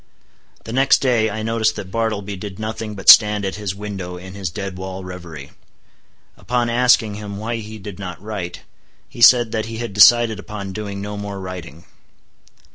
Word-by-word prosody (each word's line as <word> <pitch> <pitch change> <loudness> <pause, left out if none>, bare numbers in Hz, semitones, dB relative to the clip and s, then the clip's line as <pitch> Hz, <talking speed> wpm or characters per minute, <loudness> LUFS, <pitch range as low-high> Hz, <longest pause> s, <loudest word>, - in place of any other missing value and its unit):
The 115 - -7
next 135 +2 +4
day 120 -5 +1
I 110 +1 -5
noticed 110 -1 0
that 95 - -7
Bartleby 105 -3 -2
did 95 0 -8
nothing 110 0 -5
but 95 - -10
stand 105 -1 +8
at 95 - -3
his 100 -3 -4
window 95 -3 -6
in 95 +1 -10
his 95 -3 -4
dead 100 +1 -6
wall 95 0 -7
revery. 85 -6 -9 0.9
Upon 120 -1 -1
asking 120 -3 +3
him 100 -1 -7
why 115 +3 -3
he 110 0 -8
did 100 -1 -9
not 90 -3 -7
write, 100 -4 -6 0.5
he 120 - -11
said 120 -1 +7
that 110 -1 -2
he 115 0 -6
had 115 -3 -5
decided 110 +1 +6
upon 100 -2 -7
doing 100 -1 -5
no 105 0 -5
more 100 -1 -6
writing. 90 -4 -8
105 Hz, 180 wpm, -20 LUFS, 95-110 Hz, 0.9 s, stand